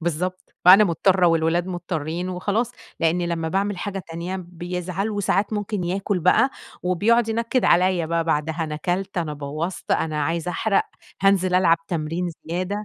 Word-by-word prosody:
بالضبط 180 +3 -3
فأنا 195 +4 +9
مضطرة 185 +1 +3
والولاد 165 +1 +2
مضطرين 175 -1 -3
وخلاص، 205 +6 -1 0.3
لأني 170 +2 +1
لمّا 165 -1 -2
باعمل 195 +1 -1
حاجة 195 -2 -4
تانية 170 +3 -4
بيزعل، 180 +3 -4
وساعات 205 0 0
ممكن 205 -3 -2
ياكل 195 +2 -1
بقى، 185 +10 +4 0.3
وبيقعد 215 +6 +2
ينكد 230 +2 0
عليّا 180 -2 +3
بقى 165 0 0
بعدها، 160 +1 -1
أنا 155 -1 -4
كلت 185 +4 -2
أنا 160 -3 -2
بوظت 155 +5 -5
أنا 155 -2 0
عايز 165 +2 -2
أحرق، 200 +3 +1 0.4
هانزل 190 -2 +3
ألعب 170 -2 +4
تمرين 165 +1 -2 0.2
زيادة، 185 +5 -3
180 Hz, 150 wpm, -23 LUFS, 165-195 Hz, 0.4 s, فأنا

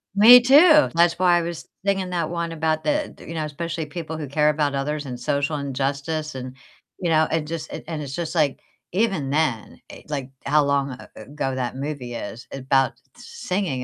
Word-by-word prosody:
Me 235 +5 +10
too, 300 +4 +7
that's 170 0 +4
why 180 -1 +4
I 175 - +1
was 170 -1 -6 0.2
thinking 195 -2 0
that 170 -3 -2
one 170 -1 -3
about 160 -1 -1
the, 300 0 -1
th - - -14
you 165 - -6
know, 155 -1 -2
especially 160 +2 -4
people 160 +1 -6
who 150 -2 -5
care 150 +2 +2
about 150 -1 0
others 145 +2 -2
and 125 -2 -6
social 145 +4 -1
injustice 140 +3 -3
and 130 0 -7 0.4
you 175 - -1
know, 160 -1 +3
and 160 -2 -1
just 165 -1 -5
and - - -7
and 160 -3 -4
it's 140 -2 -6
just, 165 -2 -4
like, 150 -5 +1 0.3
even 190 -8 0
then, 140 -6 -1
e - - -12
like, 140 -3 -4 0.2
how 150 +1 +4
long 140 -1 0
a 130 - -10
ago 135 -2 -4
that 125 -1 -3
movie 135 -3 -5
is, 115 +1 -7
about 135 0 +1 0.2
singing 185 - -3
155 Hz, 200 wpm, -23 LUFS, 140-170 Hz, 0.4 s, Me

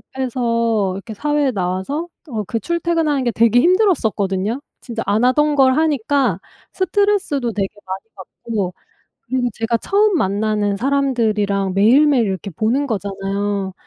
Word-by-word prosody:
졸업해서 230 -6 0
이렇게 210 +3 -7
사회에 295 +4 0
나와서 190 - -2 0.2
어 220 -5 -3
그 230 - -2
출퇴근하는 330 -5 0
게 240 - +2
되게 230 +2 +4
힘들었었거든요. 235 - +1 0.2
진짜 235 -3 -5
안 210 +3 +1
하던 295 +4 +3
걸 265 -2 +4
하니까 280 - +1 0.3
스트레스도 375 - 0
되게 195 -1 -1 0.2
많이 190 +1 -5
받고 195 0 -5 0.5
그리고 250 0 -1
제가 225 +2 -1
처음 405 - +2
만나는 205 -2 0
사람들이랑 220 -7 0
매일매일 250 +5 +4
이렇게 195 0 -3
보는 235 - 0
거잖아요. 200 -2 -3
230 Hz, 335 characters per minute, -19 LUFS, 200-280 Hz, 0.5 s, 되게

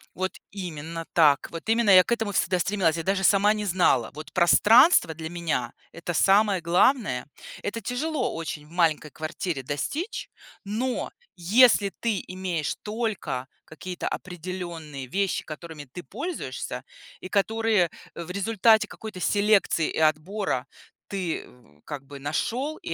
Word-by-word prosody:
Вот 185 +1 -2 0.2
именно 165 -4 -6
так. 150 -4 +4
Вот 165 +5 -7
именно 225 -2 +4
я 185 -1 +9
к - - -7
этому 225 -3 0
всегда 185 -2 +1
стремилась, 175 -3 +1
я 165 - -3
даже 195 +1 0
сама 205 +2 +5
не 210 -1 -3
знала. 170 - +2
Вот 150 +1 -10
пространство 200 - +6
для 160 0 -6
меня- 160 -8 -2 0.2
это 170 +1 -5
самое 195 +3 +4
главное. 170 - +2 0.3
Это 215 +3 -4
тяжело 265 +5 -2
очень 155 -2 -5
в - - -20
маленькой 160 -3 +1
квартире 155 -1 -4
достичь. 290 - -4 0.4
Но 240 +5 -2 0.2
если 205 +3 +5
ты 220 -6 -1
имеешь 185 -4 -3
только 210 - -3 0.2
какие-то 180 +3 -6
определенные 175 -5 -6
вещи, 195 +7 -1
которыми 155 -1 -8
ты 135 +7 -9
пользуешься, 130 - -5 0.4
и 185 - -8
которые 215 -3 +2 0.2
в 170 +1 -6
результате 220 +2 +3
какой-то 215 -3 -9
селекции 200 -3 +2
и - - -3
отбора 155 -1 0 0.4
ты 185 -5 -3
в 115 -12 -22
как 140 -2 -7
бы 140 0 -10
нашел 240 - -2
и - - -5
180 Hz, 140 wpm, -26 LUFS, 155-210 Hz, 0.4 s, я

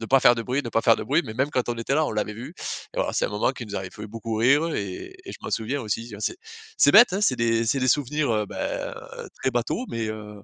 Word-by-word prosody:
de 115 - -5
pas 135 +3 +5
faire 120 - +6
de 115 - -3
bruit, 130 +5 -1
ne 120 - -4
pas 115 - +2
faire 115 - +5
de - - -5
bruit. 150 +6 +2
Mais 110 -2 -7
même 135 +4 0
quand 125 -4 -1
on 120 - 0
était 115 +4 -1
là 155 +1 +3
on - - -2
l'avait 105 -1 -2
vue. 130 - -8 0.4
Et - - -4
alors - - 0
c'est - - +1
un - - -4
moment 105 +5 0
qui 125 - -7
nous 105 - -8
avait 95 -1 -4
fait 105 +1 -8
beaucoup 115 0 -5
rire 140 +8 +3
et 100 - -5
et - - -8
je - - -10
m'en - - -5
souviens 125 +5 -1
aussi. 115 +2 -3
Tu - - -9
vois, 105 - -9
c'est 350 - -2 0.4
c'est - - +6
bête, 215 -1 +8
hein. 195 - 0
C'est 130 -12 +2
des 115 -1 +2
c'est 115 +5 +1
des 130 - +1
souvenirs, 145 -1 +1
heu, 105 -1 0
bah, - - -4 0.2
heu, - - -7
très 130 - +1
bateau, 120 - -1
mais 115 -1 -3
heu 105 -1 -6
120 Hz, 310 wpm, -25 LUFS, 110-140 Hz, 0.4 s, bête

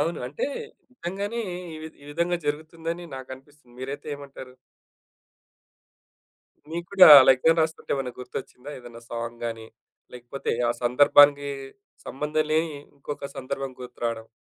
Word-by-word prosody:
అవును. 165 +2 -1
అంటే 140 - -3 0.5
నిజంగానే 200 +2 -4 0.4
ఈ - - -7
వి 160 - -6
ఈ - - -14
విధంగా 170 +3 0
జరుగుతుందని 165 +3 -4
నాకనిపిస్తుంది. 130 0 -12
మీరైతే 140 +3 -6
ఏమంటారు? 135 -2 -11 2.2
మీకు 170 +1 -4
కూడా 190 -2 +9
అలా 130 - +7
ఎగ్సామ్ 165 +5 +3
రాస్తుంటే, 160 0 -2
ఏమైనా 135 -3 -3
గుర్తొచ్చిందా? 125 +1 -8
ఏదైనా 120 -2 -12
సాంగ్ 115 0 -5
గానీ, 115 -1 -6 0.5
లేకపోతే 125 +2 -4 0.2
ఆ - - +3
సందర్భానికి, 145 +3 +6 0.6
సంబంధం 150 +3 -1
లేని 160 +1 +1 0.2
ఇంకొక 140 0 -6
సందర్భం 135 0 -4
గుర్తు 125 0 -10
రాడం. 115 -1 -2
145 Hz, 125 wpm, -25 LUFS, 125-160 Hz, 2.2 s, కూడా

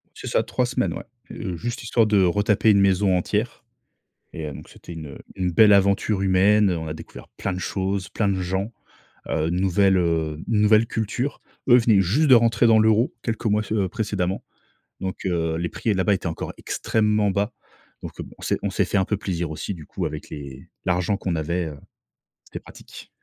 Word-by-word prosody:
C'est - - -8
ça - - +1
3 125 - -1
semaines 125 0 -1
ouais. - - -7 0.3
Heu, 95 -5 -5
juste 120 +8 -5
histoire 115 -1 +2
de 105 -2 +3
retaper 105 +4 +2
une 100 -1 +4
maison 95 -1 +3
entière 105 +6 -2 0.7
et 80 - -5
heu, 75 - -6
donc - - -11
c'était 85 - -11
une 75 -4 -8 0.2
une 90 -1 -1
belle 105 +4 +6
aventure 100 +1 +2
humaine. 100 +2 +4
On 80 -2 -3
a 75 - -4
découvert - - -11
plein 100 - -4
de 90 - -4
choses, 95 0 -2
plein 105 - -1
de 95 -1 0
gens, 95 +4 -2 0.6
heu, 80 0 0
nouvelle, 95 +2 +2
heu, 80 -3 0
nouvelle 110 0 +4
culture. 115 +6 -3 0.3
Eux 120 - +8
venaient 115 -4 +4
juste 130 - +2
de 130 - +8
rentrer 115 0 +4
dans 110 -1 +6
l'euro, 110 +3 +3
quelques 115 -1 -3
mois 105 0 +2
ce 110 - -4
heu, 100 -3 +1
précédemment. 100 -4 -2 0.6
Donc 95 0 -5
heu, 80 -3 0
les 85 +1 -2
prix 110 - -1
là-bas 95 +2 +2
étaient 95 - -4
encore 80 - -5
extrêmement 105 -2 0
bas. 100 +4 -1 0.5
Donc - - -9
heu, - - -3
b - - -13
on - - -17
s'est - - 0
on - - 0
s'est - - +1
fait - - -1
un 95 - +2
peu 105 - 0
plaisir 85 -5 -3
aussi, 80 +6 -4
du 80 -5 -10
coup - - -4
avec - - -6
les 70 -2 -9 0.2
l'argent 90 +2 +1
qu'on 90 -3 -2
avait, 85 +2 -2
heu, 75 - -8 0.7
c'était - - -8
pratique. - - -13
100 Hz, 205 wpm, -23 LUFS, 90-110 Hz, 0.7 s, Eux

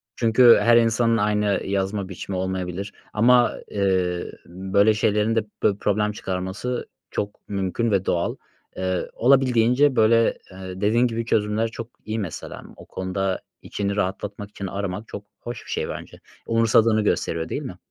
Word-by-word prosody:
Çünkü 120 +1 +6
her 120 0 +6
insanın 115 0 +3
aynı 105 -1 +1
yazma 95 0 -2
biçimi 95 +1 -5
olmayabilir 95 +1 -3 0.2
ama, 120 +3 +5 0.2
ııı, 95 -3 0
böyle 95 +4 +2
şeylerin 105 +1 +1
de 115 - +2 0.2
pö 100 -1 +2
problem 105 0 0
çıkarması 95 +5 -4 0.2
çok 105 0 -5
mümkün 100 +3 -1
ve 95 -1 +1
doğal. 85 - 0 0.4
Iıı, 95 -1 -2
olabildiğince, 130 +1 +3
böyle, 115 +1 +4
ııı, 95 0 -8
dediğin 115 +4 +3
gibi 115 0 -3
çözümler 110 0 +1
çok 115 0 -7 0.2
iyi 110 +1 -3
mesela. 90 -6 -6
O - - -13
konuda 95 0 -3 0.2
içini 100 -1 -3
rahatlatmak 105 +1 -3
için 100 -1 -6
aramak 100 +2 -4
çok 100 - -8
hoş 120 0 -7
bir - - -9
şey - - -2
bence. - - -8 0.3
Umursadığını 115 -1 +3
gösteriyor, 85 -5 -1
değil - - -3
mi? - - -7
105 Hz, 145 wpm, -23 LUFS, 95-115 Hz, 0.4 s, Çünkü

